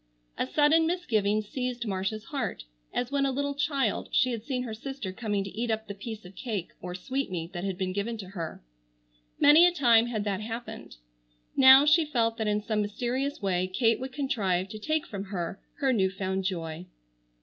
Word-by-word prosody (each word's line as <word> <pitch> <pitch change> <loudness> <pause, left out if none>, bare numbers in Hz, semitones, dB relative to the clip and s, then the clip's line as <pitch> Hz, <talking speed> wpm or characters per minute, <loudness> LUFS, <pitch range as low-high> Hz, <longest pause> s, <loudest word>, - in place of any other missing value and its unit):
A - - -1
sudden 310 - +4
misgiving 215 - +1
seized 250 +2 -3
Marcia's 195 +1 -2
heart, 275 - -4 0.3
as 245 +1 -2
when 280 -1 +1
a 275 - +2
little 285 +2 -1
child, 280 -6 0
she 255 - +3
had 230 -3 -4
seen 250 -1 -2
her 230 -3 -5
sister 235 -3 -5
coming 205 -2 -1
to 195 - -7
eat 235 +2 -2
up 220 0 -1
the 200 - -5
piece 215 +1 -8
of 180 - -11
cake 210 -9 -4
or 180 0 -5
sweetmeat 185 -6 -3
that 175 0 -4
had 195 -2 -2
been 185 -1 -2
given 215 +4 -2
to 195 -4 -8
her. 170 - -6 0.8
Many 310 +5 +8
a - - +3
time 240 -8 +4
had 220 -3 -2
that 205 -1 -2
happened. 230 - -7 0.6
Now, 265 +1 +9
she 320 +3 +5
felt 230 -6 0
that 220 -2 -1
in 210 0 +1
some 215 -1 0
mysterious 245 +6 -2
way 185 -1 +1
Kate 225 +4 +2
would 260 +1 -5
contrive 200 -9 0
to 215 - -7
take 310 +7 -1
from 200 -1 -6
her 195 -1 -4 0.2
her 270 -3 +1
new 190 -5 +2
found 190 0 -3
joy. 170 -2 -3
220 Hz, 195 wpm, -28 LUFS, 195-265 Hz, 0.8 s, Now